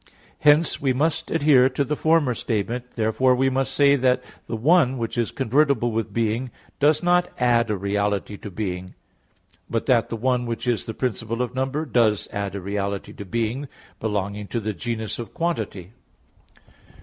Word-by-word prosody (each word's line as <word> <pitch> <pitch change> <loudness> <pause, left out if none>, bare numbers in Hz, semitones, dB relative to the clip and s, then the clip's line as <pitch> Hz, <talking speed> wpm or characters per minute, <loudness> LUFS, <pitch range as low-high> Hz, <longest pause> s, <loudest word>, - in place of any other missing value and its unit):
Hence 150 +2 +4
we 135 -2 +2
must 160 +4 0
adhere 145 -5 +5
to 135 +2 0
the 150 +2 -2
former 155 -4 +2
statement; 120 +2 -3
therefore 120 +3 +2
we 135 +1 +2
must 135 0 0
say 140 -1 +4
that 125 -1 +2 0.2
the - - -3
"one" 135 +2 +3
which 115 -2 -3
is 120 -2 0
convertible 135 -2 +1
with 115 0 -2
"being," 115 +2 -1 0.3
does 150 +2 +3
not 175 0 +3
add 120 -2 +2
a 105 - 0
reality 100 +1 -1
to 105 - -8
being; 95 -2 -5 0.7
but 115 - -1
that 120 -4 +3
the 115 - -3
"one" 125 +1 0
which 115 +1 -4
is 120 -3 0
the 110 - -5
principle 115 -1 -2
of 125 - -5
number, 135 +4 -1
does 115 -7 +2
add 100 -1 -3
a 100 - -4
reality 100 +1 -3
to 100 - -8
"being," 115 +7 -2 0.3
belonging 105 -1 -2
to 115 - -2
the 110 -1 -3
genus 110 +1 -4
of 115 - -7
quantity. 110 - -3
120 Hz, 175 wpm, -23 LUFS, 110-135 Hz, 0.7 s, adhere